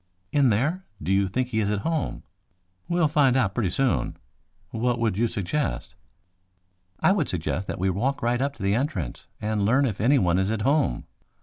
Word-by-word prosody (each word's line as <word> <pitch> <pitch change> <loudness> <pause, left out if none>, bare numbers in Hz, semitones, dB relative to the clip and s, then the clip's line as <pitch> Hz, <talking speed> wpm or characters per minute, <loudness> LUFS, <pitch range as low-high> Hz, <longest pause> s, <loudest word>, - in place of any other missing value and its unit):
"In 140 -3 +4
there? 145 - 0 0.2
Do 80 +5 -3
you 100 0 +3
think 125 +6 -1
he 110 -3 0
is 105 -2 +1
at 105 -1 -1
home?" 160 +4 -2 0.7
"We'll 170 -2 +3
find 145 -4 +3
out 100 -7 +1
pretty 105 -5 0
soon. 130 +7 0 0.5
What 120 +2 0
would 115 -4 0
you 115 +4 +2
suggest?" 100 - -2 1.1
"I - - +5
would 185 -7 +1
suggest 90 +2 -2
that - - -4
we 95 +1 +1
walk 125 +9 -1
right 120 +1 +1
up 140 +1 -1
to - - -8
the 100 +1 +2
entrance 140 +7 -2
and 105 -1 -1
learn 130 +7 +3
if 105 -6 -2
anyone 110 -8 +3
is 95 +1 +1
at 110 -1 -1
home. 140 - +1
115 Hz, 190 wpm, -25 LUFS, 100-140 Hz, 1.1 s, I